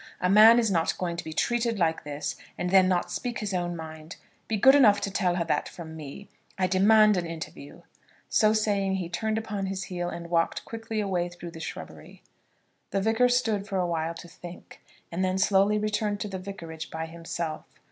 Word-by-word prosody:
A 180 Hz, -, +1 dB
man 220 Hz, +3 st, +8 dB
is 225 Hz, -4 st, +2 dB
not 165 Hz, -3 st, +1 dB
going 175 Hz, -2 st, -2 dB
to -, -, -4 dB
be 160 Hz, -, -7 dB
treated 235 Hz, +7 st, 0 dB
like 165 Hz, -3 st, 0 dB
this, 145 Hz, 0 st, -4 dB, 0.2 s
and 180 Hz, 0 st, -2 dB
then 190 Hz, -1 st, +6 dB
not 180 Hz, -1 st, 0 dB
speak 245 Hz, -2 st, -3 dB
his 205 Hz, -2 st, -3 dB
own 175 Hz, -1 st, -1 dB
mind. 160 Hz, +1 st, -9 dB, 0.3 s
Be 220 Hz, -, -1 dB
good 265 Hz, +7 st, +7 dB
enough 220 Hz, -8 st, +6 dB
to 200 Hz, -, -2 dB
tell 185 Hz, -3 st, +1 dB
her 175 Hz, -, 0 dB
that 165 Hz, -, -1 dB
from 160 Hz, -2 st, -9 dB
me. 155 Hz, +6 st, -9 dB, 0.3 s
I 190 Hz, -, +2 dB
demand 210 Hz, +3 st, +5 dB
an 175 Hz, -1 st, -2 dB
interview." 160 Hz, -3 st, -9 dB, 0.4 s
So 215 Hz, -1 st, +3 dB
saying 205 Hz, -3 st, +1 dB
he 180 Hz, -3 st, -3 dB
turned 220 Hz, +5 st, -1 dB
upon 210 Hz, -3 st, -3 dB
his 190 Hz, 0 st, -3 dB
heel, 175 Hz, -1 st, -4 dB
and 170 Hz, 0 st, -7 dB
walked 165 Hz, -1 st, 0 dB
quickly 225 Hz, -1 st, -4 dB
away 180 Hz, -3 st, -1 dB
through 175 Hz, -1 st, -9 dB
the 165 Hz, -, -10 dB
shrubbery. 160 Hz, -, -9 dB, 0.7 s
The 195 Hz, -, 0 dB
Vicar 225 Hz, +5 st, +3 dB
stood 225 Hz, -5 st, +1 dB
for 195 Hz, -, -2 dB
awhile 170 Hz, -2 st, -1 dB
to 175 Hz, -, -10 dB
think, 175 Hz, +1 st, -12 dB, 0.3 s
and 175 Hz, +3 st, -1 dB
then 185 Hz, 0 st, 0 dB
slowly 195 Hz, +2 st, +3 dB
returned 210 Hz, -1 st, -1 dB
to -, -, -2 dB
the 190 Hz, -2 st, -5 dB
vicarage 165 Hz, -4 st, -8 dB
by 160 Hz, 0 st, -4 dB
himself. 165 Hz, -1 st, -5 dB
185 Hz, 200 wpm, -27 LUFS, 170-210 Hz, 0.7 s, man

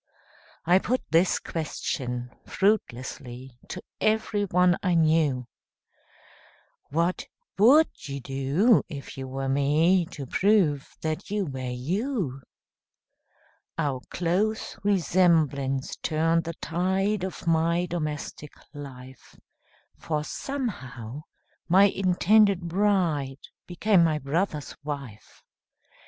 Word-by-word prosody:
I 180 Hz, +3 st, +5 dB
put 250 Hz, +6 st, -1 dB
this 170 Hz, +3 st, +4 dB
question, 125 Hz, -6 st, -4 dB, 0.2 s
fruitlessly, 130 Hz, -, -2 dB
To -, -, -7 dB, 0.2 s
everyone 205 Hz, -5 st, +2 dB
I 180 Hz, -3 st, +1 dB
knew, 155 Hz, -6 st, +2 dB, 1.4 s
"What 170 Hz, +5 st, 0 dB, 0.3 s
would 275 Hz, -, +5 dB
you 140 Hz, 0 st, -4 dB
do, 135 Hz, -, +2 dB
if 140 Hz, -4 st, -8 dB
you 135 Hz, 0 st, -6 dB
were 135 Hz, +1 st, -4 dB
me, 155 Hz, +6 st, +3 dB
To 145 Hz, -6 st, -8 dB
prove 175 Hz, -, +2 dB, 0.2 s
that 155 Hz, -1 st, -3 dB
you 205 Hz, -1 st, -1 dB
were 130 Hz, -4 st, -5 dB
you?" 160 Hz, -, -2 dB, 1.4 s
Our 140 Hz, -5 st, -1 dB
close 190 Hz, +6 st, -1 dB
resemblance 160 Hz, -8 st, +2 dB
turned 165 Hz, +1 st, +1 dB
the 165 Hz, 0 st, -5 dB
tide 190 Hz, +5 st, -1 dB
Of 190 Hz, -1 st, -5 dB
my 165 Hz, +1 st, +2 dB
domestic 150 Hz, -3 st, -5 dB, 0.2 s
life, 130 Hz, -3 st, -11 dB, 0.6 s
For 150 Hz, -2 st, -2 dB
somehow, 140 Hz, -, -5 dB, 0.5 s
my 190 Hz, +3 st, +6 dB
intended 195 Hz, +1 st, +4 dB
bride 170 Hz, -7 st, 0 dB, 0.3 s
Became 180 Hz, +1 st, +3 dB
my 160 Hz, -2 st, +2 dB
brother's 150 Hz, +2 st, -2 dB
wife. 140 Hz, -8 st, -8 dB
165 Hz, 95 wpm, -26 LUFS, 140-190 Hz, 1.4 s, my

